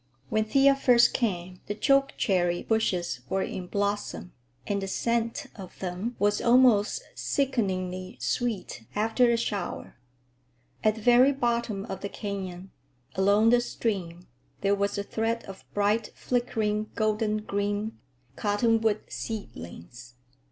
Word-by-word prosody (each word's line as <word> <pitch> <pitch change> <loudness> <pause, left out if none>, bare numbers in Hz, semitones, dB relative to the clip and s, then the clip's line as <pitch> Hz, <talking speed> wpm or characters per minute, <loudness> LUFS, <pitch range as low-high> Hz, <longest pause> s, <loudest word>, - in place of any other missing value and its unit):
When 215 0 +1
Thea 275 +5 +5
first 245 -3 +5
came, 180 -6 -2
the 205 - -2
chokecherry 200 -10 +2
bushes 185 - 0
were 190 0 +1
in 180 -1 -5
blossom, 205 -2 -2 0.3
and 200 -1 -1
the 195 - -3
scent 230 +3 -1
of 190 -4 -10
them 190 +6 -4
was 205 0 +2
almost 240 - +4
sickeningly 185 -9 -1
sweet 220 - -2
after 225 +4 +3
a 235 - +3
shower. 200 - -4 0.9
At 215 0 +3
the 220 - -9
very 245 +4 +6
bottom 235 -6 -1
of 190 - -6
the 200 - -4
canyon, 190 -3 -6 0.4
along 205 +4 +4
the 240 0 +5
stream, 180 -8 -3 0.4
there 200 0 +3
was 200 0 0
a 200 - -1
thread 225 +2 -1
of 195 -1 -10
bright, 210 +2 +1
flickering, 215 -4 -1
golden 215 0 +1
green,—cottonwood 205 - -1
seedlings. 120 - -8
210 Hz, 125 wpm, -27 LUFS, 190-230 Hz, 0.9 s, very